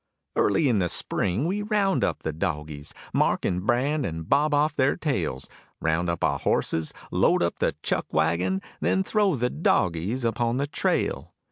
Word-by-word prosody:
Early 105 +9 +3
in 115 -5 +2
the 90 -2 +1
spring 100 - 0
we 195 +5 -1
round 205 -2 +1
up - - -1
the 80 - -2
dogies, 75 -1 -4 0.2
Mark - - +2
and 90 +1 -1
brand 140 +5 +1
and 80 -6 -4
bob 150 +2 +3
off 145 +1 +2
their 130 +1 +2
tails; 85 - -2 0.3
Round 80 +2 0
up 85 - -2
our - - +1
horses, 80 -1 0 0.2
load - - +3
up - - -1
the - - +1
chuck - - -1
wagon, 85 +4 +1 0.2
Then 95 +4 +1
throw 205 - +2
the 125 -1 0
dogies 105 - 0
upon 115 +1 0
the 140 - 0
trail. 85 - -1
100 Hz, 170 wpm, -25 LUFS, -, 0.3 s, Early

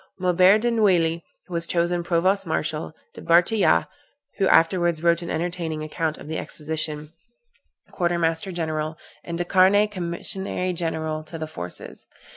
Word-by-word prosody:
Maubert 185 +3 +4
de 240 +1 +1
Neuilly 175 -7 +2 0.2
was 170 -1 -1
chosen 175 0 0
provost 185 +3 +2
marshal, 155 0 -3 0.2
De - - -10
Bartillat 175 +6 +3 0.5
(who 195 - +3
afterwards 170 0 +3
wrote 170 0 +3
an 170 - -6
entertaining 165 -2 -3
account 155 0 -2
of - - -11
the 160 - -3
expedition) 155 0 -5 0.8
quarter 175 -2 0
master 165 +2 0
general, 155 -2 -3 0.3
and 170 -1 -5
De 175 - -2
Carne 195 +3 +4
commissary 185 0 -3
general 160 -2 -3
to 165 +1 -8
the 155 - -4
forces. 90 - -8
170 Hz, 140 wpm, -24 LUFS, 160-180 Hz, 0.8 s, Maubert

